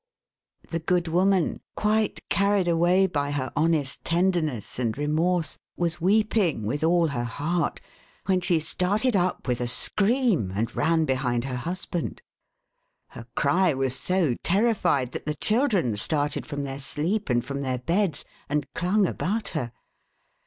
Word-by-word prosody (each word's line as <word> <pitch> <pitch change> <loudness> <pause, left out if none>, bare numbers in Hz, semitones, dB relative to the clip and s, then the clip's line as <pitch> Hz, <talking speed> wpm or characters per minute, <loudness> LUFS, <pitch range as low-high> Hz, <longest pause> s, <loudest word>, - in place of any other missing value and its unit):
" - - -32
The 165 - -1
good 175 +1 0
woman, 185 +1 +2 0.2
quite 215 0 0
carried 200 -2 +2
away 175 +3 +3
by 145 -6 -1
her 135 -3 -2
honest 155 -3 +1
tenderness 165 - 0
and 115 -2 -1
remorse, 160 +4 0 0.2
was 170 -1 -1
weeping 200 - +2
with 145 +8 -2
all 170 0 +3
her 120 -4 -2
heart, 155 +9 -2 0.5
when 185 -1 +2
she 175 -2 +2
started 205 +9 0
up 180 -4 0
with 125 -1 0
a 120 - -1
scream, 200 - +2
and 115 +3 -2
ran 160 -1 +2
behind 125 -3 0
her 130 -1 -4
husband. 175 +3 -4 0.9
Her 115 - -11
cry 160 +2 +2
was 130 -1 0
so 180 -6 +1
terrified, 180 - +2
that - - -7
the 150 - -1
children 210 - +1
started 145 +7 -1
from 145 -1 -4
their 135 0 -5
sleep 165 +9 -2
and 120 -1 +1
from 140 +1 -4
their 130 -2 -1
beds, 170 +4 0 0.2
and 150 -1 0
clung 190 +4 +2
about 205 +4 -2
her. 125 -8 -3
165 Hz, 150 wpm, -25 LUFS, 135-185 Hz, 0.9 s, away